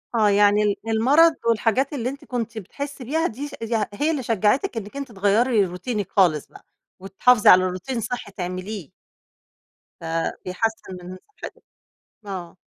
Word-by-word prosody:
آه، 215 Hz, -2 st, +4 dB
يعني 205 Hz, +1 st, +4 dB
ال 205 Hz, -1 st, +1 dB
المرض 280 Hz, +9 st, +4 dB
والحاجات 235 Hz, +5 st, +1 dB
اللي 250 Hz, -2 st, -2 dB
أنتِ 280 Hz, +1 st, -9 dB
كنتِ 230 Hz, -3 st, -4 dB
بتحسّي 280 Hz, +7 st, -7 dB
بيها 320 Hz, +7 st, 0 dB
دي 275 Hz, +6 st, -6 dB
ش 290 Hz, -, -12 dB
يع 225 Hz, -2 st, 0 dB
هي 295 Hz, +9 st, 0 dB
اللي 280 Hz, -5 st, -2 dB
شجعتِك 225 Hz, -, +1 dB
إنِّك 210 Hz, +4 st, -6 dB
أنتِ 280 Hz, -3 st, -6 dB
تغيّري 205 Hz, +2 st, +2 dB
روتينِك 190 Hz, +3 st, -4 dB
خالص 170 Hz, -7 st, +2 dB
بقى، -, -, -17 dB, 0.3 s
وتحافظي 205 Hz, +5 st, +3 dB
على 185 Hz, 0 st, +8 dB
روتين 185 Hz, +7 st, -4 dB
صحّي 225 Hz, -2 st, -5 dB
تعمليه؟ 185 Hz, -2 st, -6 dB, 1.1 s
ف -, -, -14 dB, 0.4 s
بيحسّن 190 Hz, 0 st, -3 dB
من 185 Hz, +1 st, -8 dB, 0.2 s
صحتِك، -, -, -9 dB, 0.6 s
آه، 185 Hz, -4 st, -7 dB
220 Hz, 150 wpm, -23 LUFS, 195-255 Hz, 1.1 s, على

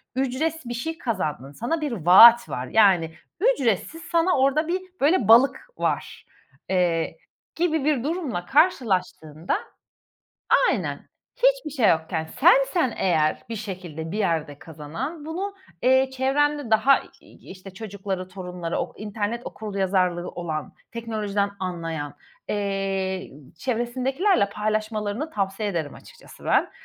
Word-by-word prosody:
"Ücretsiz 270 Hz, +4 st, -1 dB
bir 240 Hz, -, -3 dB
şey 320 Hz, +7 st, -4 dB
kazandın, 150 Hz, -, -3 dB
sana 275 Hz, -, -3 dB
bir 295 Hz, -, -2 dB
vaat 230 Hz, +5 st, +7 dB
var," 125 Hz, +1 st, -4 dB
yani 185 Hz, -7 st, +4 dB, 0.3 s
"Ücretsiz 325 Hz, -, +1 dB
sana 340 Hz, 0 st, +1 dB
orada 275 Hz, +4 st, +2 dB
bir 370 Hz, +2 st, -1 dB, 0.2 s
böyle 290 Hz, -, +3 dB
balık 245 Hz, -, +5 dB
var," -, -, -2 dB, 0.4 s
eee, 175 Hz, -, 0 dB, 0.4 s
gibi 320 Hz, -4 st, 0 dB
bir 290 Hz, -5 st, +1 dB
durumla 285 Hz, -, -3 dB
karşılaştığında 185 Hz, -, +1 dB, 1.1 s
Aynen. -, -, -3 dB, 0.3 s
Hiçbir -, -, +2 dB
şey 255 Hz, -7 st, +2 dB
yokken 160 Hz, 0 st, -1 dB, 0.2 s
sensen 350 Hz, -, +4 dB
eğer 155 Hz, -4 st, +1 dB
bir 225 Hz, -, -4 dB
şekilde 180 Hz, -6 st, -6 dB
bir 210 Hz, -, -3 dB
yerde 160 Hz, -7 st, -1 dB
kazanan, 165 Hz, -, -7 dB
bunu, 380 Hz, +6 st, -4 dB, 0.3 s
eee, 260 Hz, +1 st, +4 dB
çevrende 275 Hz, 0 st, 0 dB
daha 265 Hz, +5 st, +5 dB, 0.2 s
i -, -, -17 dB
işte, 190 Hz, +1 st, -10 dB
çocukları, 195 Hz, -3 st, -5 dB
torunları, 180 Hz, -3 st, -5 dB
okur -, -, -5 dB
internet 215 Hz, +2 st, -3 dB
okuryazarlığı 190 Hz, -4 st, -1 dB
olan, 160 Hz, -3 st, -5 dB, 0.2 s
teknolojiden 210 Hz, -3 st, -2 dB
anlayan, 165 Hz, -5 st, -4 dB, 0.3 s
eee, 195 Hz, -2 st, -2 dB, 0.2 s
ı -, -, -36 dB
çevresindekilerle 255 Hz, -, 0 dB
paylaşmalarını 215 Hz, +5 st, -2 dB
tavsiye 195 Hz, 0 st, -2 dB
ederim 160 Hz, -6 st, -3 dB
açıkçası -, -, -15 dB
ben. -, -, +2 dB
215 Hz, 120 wpm, -24 LUFS, 180-275 Hz, 1.1 s, vaat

